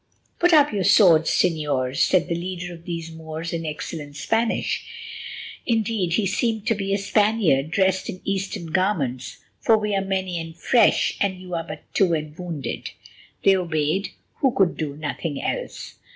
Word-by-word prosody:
"Put 350 Hz, +1 st, +4 dB
up 295 Hz, -5 st, +5 dB
your 200 Hz, -2 st, 0 dB
swords, 170 Hz, -5 st, +6 dB
Señors," 145 Hz, -6 st, +1 dB
said 175 Hz, -2 st, +3 dB
the 170 Hz, -, -1 dB
leader 175 Hz, 0 st, -4 dB
of 165 Hz, 0 st, -13 dB
these 165 Hz, -2 st, -5 dB
Moors 160 Hz, +1 st, -6 dB
in 165 Hz, -1 st, -3 dB
excellent 150 Hz, -1 st, -6 dB
Spanish—indeed, 225 Hz, -, -2 dB
he 210 Hz, +3 st, +2 dB
seemed 220 Hz, +2 st, 0 dB
to 235 Hz, -, +3 dB
be 195 Hz, -2 st, -3 dB
a 200 Hz, -, +3 dB
Spaniard 200 Hz, -8 st, +2 dB
dressed 190 Hz, +2 st, +1 dB
in 185 Hz, -, -5 dB
Eastern 195 Hz, -4 st, -3 dB
garments—"for 180 Hz, -, 0 dB
we 210 Hz, -1 st, -1 dB
are 195 Hz, -, +1 dB
many 190 Hz, -2 st, -2 dB
and 165 Hz, 0 st, -8 dB
fresh; 235 Hz, +7 st, +3 dB
and 190 Hz, -2 st, 0 dB
you 180 Hz, -1 st, -9 dB
are 165 Hz, -1 st, -1 dB
but 155 Hz, 0 st, -8 dB
two 180 Hz, -4 st, +3 dB
and 150 Hz, -1 st, -5 dB
wounded." 170 Hz, -5 st, -5 dB, 0.5 s
They 195 Hz, -, +6 dB
obeyed, 170 Hz, +1 st, 0 dB, 0.3 s
who 270 Hz, -3 st, +3 dB
could 190 Hz, -3 st, +3 dB
do 150 Hz, -3 st, -4 dB
nothing 150 Hz, 0 st, -3 dB
else. -, -, -4 dB
180 Hz, 160 wpm, -23 LUFS, 160-200 Hz, 0.5 s, swords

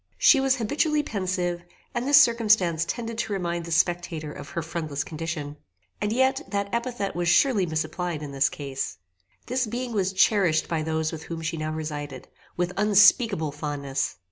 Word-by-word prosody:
She 280 Hz, -, +6 dB
was 270 Hz, 0 st, +3 dB
habitually 295 Hz, +6 st, 0 dB
pensive, 185 Hz, -6 st, -2 dB, 0.3 s
and 240 Hz, +1 st, -2 dB
this 285 Hz, -, +8 dB
circumstance 210 Hz, -8 st, +3 dB
tended 230 Hz, +3 st, -4 dB
to 215 Hz, -, -2 dB
remind 175 Hz, -3 st, -2 dB
the 170 Hz, -, -7 dB
spectator 165 Hz, -2 st, 0 dB
of -, -, -9 dB
her 170 Hz, -, -4 dB
friendless 155 Hz, -3 st, -3 dB
condition; 155 Hz, -2 st, -5 dB, 0.4 s
and 210 Hz, -, 0 dB
yet 260 Hz, +3 st, +2 dB
that 200 Hz, -1 st, -3 dB
epithet 235 Hz, -4 st, -2 dB
was 175 Hz, 0 st, -1 dB
surely 210 Hz, -5 st, +3 dB
misapplied 160 Hz, 0 st, -3 dB
in 145 Hz, -, -6 dB
this 140 Hz, 0 st, +2 dB
case. 135 Hz, -2 st, -5 dB, 0.5 s
This 255 Hz, -1 st, -1 dB
being 240 Hz, +2 st, -4 dB
was 195 Hz, -3 st, 0 dB
cherished 190 Hz, -4 st, +3 dB
by 165 Hz, -2 st, -1 dB
those 160 Hz, 0 st, -1 dB
with 160 Hz, 0 st, -7 dB
whom 165 Hz, -1 st, -6 dB
she 165 Hz, +1 st, -2 dB
now 155 Hz, -1 st, -3 dB
resided, 145 Hz, -4 st, -5 dB, 0.3 s
with 175 Hz, 0 st, -1 dB
unspeakable 205 Hz, -4 st, +4 dB
fondness. 140 Hz, -2 st, -3 dB
175 Hz, 170 wpm, -25 LUFS, 155-220 Hz, 0.5 s, this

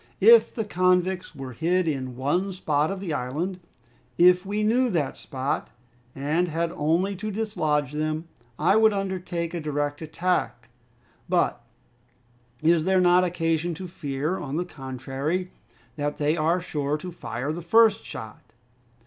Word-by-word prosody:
If 465 Hz, 0 st, +7 dB
the 225 Hz, -, -2 dB
convicts 185 Hz, -1 st, +1 dB
were 130 Hz, -2 st, -7 dB
hid 175 Hz, +7 st, +1 dB
in 130 Hz, -4 st, -2 dB
one 175 Hz, +10 st, 0 dB
spot 155 Hz, -4 st, 0 dB
of 195 Hz, 0 st, -4 dB
the 180 Hz, -5 st, -3 dB
island, 155 Hz, +9 st, -3 dB, 0.6 s
if 180 Hz, +2 st, +5 dB
we 210 Hz, +1 st, -1 dB
knew 245 Hz, +4 st, +3 dB
that 155 Hz, -, -1 dB
spot, 135 Hz, +1 st, -3 dB, 0.5 s
and 150 Hz, +6 st, 0 dB
had 165 Hz, +1 st, -1 dB
only 170 Hz, +7 st, 0 dB
to 215 Hz, +3 st, -4 dB
dislodge 155 Hz, -, -1 dB
them, 155 Hz, +2 st, -2 dB, 0.3 s
I 180 Hz, +7 st, +3 dB
would 220 Hz, -1 st, +5 dB
undertake 180 Hz, -4 st, -3 dB
a 175 Hz, -, -2 dB
direct 145 Hz, 0 st, -2 dB
attack; 175 Hz, +3 st, -2 dB, 0.6 s
but -, -, +1 dB, 1.0 s
is 165 Hz, 0 st, +4 dB
there 190 Hz, 0 st, +3 dB
not 180 Hz, 0 st, +5 dB
occasion 165 Hz, -1 st, 0 dB
to 185 Hz, +3 st, -7 dB
fear, 150 Hz, +2 st, -3 dB
on 145 Hz, -3 st, -4 dB
the 175 Hz, -, -1 dB
contrary, 135 Hz, +4 st, -4 dB, 0.5 s
that 145 Hz, 0 st, -2 dB
they 150 Hz, +1 st, +1 dB
are 165 Hz, +3 st, +2 dB
sure 150 Hz, -4 st, -2 dB
to 180 Hz, +4 st, -7 dB
fire 125 Hz, -2 st, -4 dB
the 170 Hz, -, -5 dB
first 220 Hz, +4 st, +4 dB
shot?" 110 Hz, 0 st, -9 dB
170 Hz, 150 wpm, -25 LUFS, 145-185 Hz, 1.0 s, If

